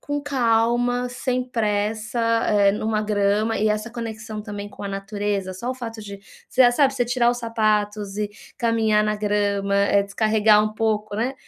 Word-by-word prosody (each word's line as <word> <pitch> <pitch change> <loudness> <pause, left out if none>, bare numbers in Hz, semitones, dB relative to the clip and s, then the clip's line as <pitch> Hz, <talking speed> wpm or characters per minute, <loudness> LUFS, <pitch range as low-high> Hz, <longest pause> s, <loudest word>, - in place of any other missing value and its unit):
com 290 0 -3
calma, 245 -2 +1
sem 250 +1 -2
pressa, 220 0 -1 0.3
eh, 200 -1 +4
numa 215 0 -1
grama 210 +1 +1
e 215 - +2
essa 215 +2 -2
conexão 220 -2 -6
também 205 -1 -7
com - - -11
a - - -3
natureza. 195 -1 -3
Só 190 +7 -6
o - - -3
fato 230 -3 -7
de 200 -2 -9 0.3
você, 250 -1 +5
sabe, 275 +1 +3
você 245 - +1
tirar 240 0 +2
os 245 - -3
sapatos 210 -3 -1
e 210 -1 -2 0.3
caminhar 225 -2 +2
na 215 0 0
grama, 205 -1 0
eh, 200 0 +3
descarregar 210 +1 +3
um 215 - -3
pouco, 215 -2 -1
né. 245 +5 -1
215 Hz, 175 wpm, -23 LUFS, 205-235 Hz, 0.3 s, você